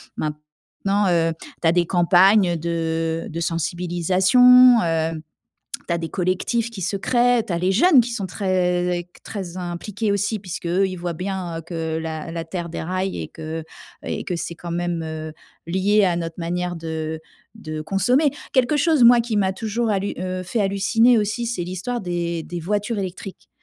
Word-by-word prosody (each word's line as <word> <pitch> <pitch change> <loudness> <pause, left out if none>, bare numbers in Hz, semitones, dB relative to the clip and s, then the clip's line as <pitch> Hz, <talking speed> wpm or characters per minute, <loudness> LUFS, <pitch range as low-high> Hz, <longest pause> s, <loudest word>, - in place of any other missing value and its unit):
Maintenant, 150 +7 -3
heu, 165 -1 +2 0.3
tu 170 - +2
as 165 - +4
des 175 0 +2
campagnes 180 +2 +4
de 165 0 -2
de 165 - -5
sensibilisation, 185 - +4
heu, 165 -1 -1 0.7
tu - - 0
as 170 - 0
des 165 -1 -4
collectifs 190 +7 -1
qui 225 -4 -8
se 195 +3 -1
créent, 240 +3 +2
tu - - -3
as 170 - 0
les 180 +2 +1
jeunes 280 - +6
qui 240 +1 -2
sont 200 -4 -3
très 180 -2 0
très 185 -4 -6
impliqués 185 +4 -3
aussi 200 +2 0
puisque 180 -3 -7
eux 190 +3 +2
ils 185 - -6
voient 175 0 -3
bien 180 -1 -4
heu - - -7
que 160 -1 -3
la 160 0 -5
la 165 -1 -4
terre 170 +1 -5
déraille 185 +3 -3
et - - -5
que 160 0 -6 0.4
et - - -4
que 180 - -3
c'est 170 - -4
quand 170 +1 -8
même, 175 -1 -2
heu, 160 0 -6 0.3
lié 195 +4 +2
à 175 -2 +1
notre 165 -1 -4
manière 175 +1 -2
de 160 -1 -4 0.3
de 155 -8 -6
consommer. 245 - +2 0.2
Quelque 260 +3 +3
chose 305 -3 +4
moi 240 0 +8
qui 230 -2 -2
m'a 190 -2 +2
toujours 225 +3 -2
hallu 200 0 -1
heu, 185 0 -3
fait 215 +5 -2
halluciner 210 +5 +3
aussi 215 +3 -1
c'est 225 -7 -2
l'histoire 185 +8 -4
des 170 -2 -2
des 175 -1 -6
voitures 210 +5 -2
électriques. 190 0 -7
180 Hz, 180 wpm, -22 LUFS, 170-205 Hz, 0.7 s, moi